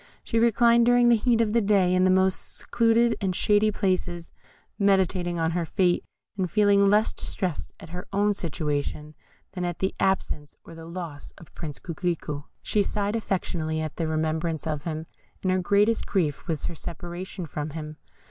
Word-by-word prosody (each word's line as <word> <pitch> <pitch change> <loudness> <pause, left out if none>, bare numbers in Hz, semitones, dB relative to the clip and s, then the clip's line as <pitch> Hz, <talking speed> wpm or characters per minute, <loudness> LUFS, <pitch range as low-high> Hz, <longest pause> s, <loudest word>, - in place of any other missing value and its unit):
She 230 - 0
reclined 235 +1 +4
during 245 0 +5
the 235 - +6
heat 230 +1 +2
of 215 -2 +1
the 235 - +4
day 195 -3 +3
in 185 0 +4
the - - +4
most 190 0 +1
secluded 230 0 +2
and 190 -2 0
shady 210 +2 +3
places, 185 -4 -1 0.5
meditating 190 -3 +2
on 165 0 +1
her 175 0 -1
fate, 175 +1 +1 0.3
and 185 -3 -1
feeling 200 -1 +4
less 210 +2 +3
distressed 180 -6 -2
at - - -11
her 180 +2 -7
own 205 +1 +2
situation 150 -4 -3 0.4
than 180 -2 -4
at 175 -1 -2
the 190 - -1
absence 150 -6 -1
or - - -11
the 165 0 -10
loss 170 -4 -7
of 170 - -15
Prince 150 -4 -6
Coquerico. 165 -4 -3 0.2
She 210 - +2
sighed 205 +1 -1
affectionately 170 -7 -2
at 155 -1 -4
the 165 - -1
remembrance 160 0 -1
of 150 -2 -3
him, 160 -1 -3 0.4
and 185 - +2
her 185 - +2
greatest 205 +4 +2
grief 160 -8 -1
was 160 -4 -2
her - - -2
separation 175 +3 -6
from 150 0 -4
him. 155 0 -7
180 Hz, 175 wpm, -26 LUFS, 160-205 Hz, 0.5 s, the